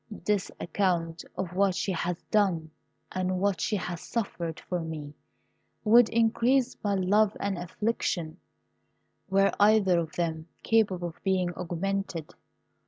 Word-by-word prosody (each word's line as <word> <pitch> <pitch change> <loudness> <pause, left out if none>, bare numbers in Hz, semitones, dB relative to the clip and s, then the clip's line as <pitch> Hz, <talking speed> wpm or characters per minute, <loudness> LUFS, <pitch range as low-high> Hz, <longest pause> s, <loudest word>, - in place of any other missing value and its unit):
This 205 -2 +1
account 170 -3 -1
of 180 -2 -3
what 195 -1 +3
she 195 - -1
has 175 -1 -2
done 180 -7 +2 0.4
and 185 0 -1
what 195 -3 +1
she 215 - 0
has 175 -3 -4
suffered 175 -8 -3
for 180 - -3
me 155 -3 -6 0.7
would 230 +1 +6
increase 235 +3 +2
my 205 -1 +1
love 200 +3 +3
and 200 0 -1
my 175 - -5
affliction, 175 -5 -2 0.9
were 195 +1 +4
either 205 -4 +5
of 160 -2 -4
them 160 -2 -2 0.2
capable 195 -6 +2
of 165 - -17
being 185 -2 +1
augmented. 180 -1 -3
185 Hz, 135 wpm, -28 LUFS, 170-205 Hz, 0.9 s, would